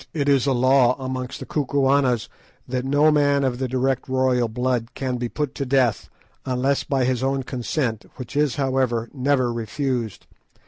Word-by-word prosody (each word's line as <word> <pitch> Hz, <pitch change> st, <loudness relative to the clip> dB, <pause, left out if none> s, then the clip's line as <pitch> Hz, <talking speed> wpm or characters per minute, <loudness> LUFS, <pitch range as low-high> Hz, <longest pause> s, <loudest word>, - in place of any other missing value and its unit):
It 145 Hz, -3 st, 0 dB
is 140 Hz, -1 st, +3 dB
a -, -, +3 dB
law 130 Hz, 0 st, +4 dB
amongst 130 Hz, -1 st, -5 dB
the -, -, -5 dB
Kukuanas 135 Hz, -4 st, +1 dB, 0.4 s
that 125 Hz, 0 st, -2 dB
no 145 Hz, +3 st, +4 dB
man 145 Hz, -1 st, +3 dB
of 130 Hz, -2 st, -1 dB
the 130 Hz, -, -1 dB
direct 130 Hz, +1 st, -1 dB
royal 130 Hz, -2 st, +2 dB
blood 125 Hz, +1 st, -2 dB
can 130 Hz, -2 st, -2 dB
be 120 Hz, -1 st, -3 dB
put 150 Hz, 0 st, -3 dB
to -, -, -3 dB
death, 125 Hz, -5 st, +1 dB, 0.3 s
unless 130 Hz, +2 st, 0 dB
by 135 Hz, -3 st, 0 dB
his 125 Hz, -1 st, 0 dB
own 135 Hz, 0 st, 0 dB
consent, 125 Hz, -2 st, -3 dB
which 125 Hz, 0 st, -9 dB
is, 145 Hz, -4 st, +2 dB
however, 130 Hz, -4 st, 0 dB
never 130 Hz, -3 st, +1 dB
refused. 115 Hz, -, -3 dB
130 Hz, 170 wpm, -23 LUFS, 125-140 Hz, 0.4 s, law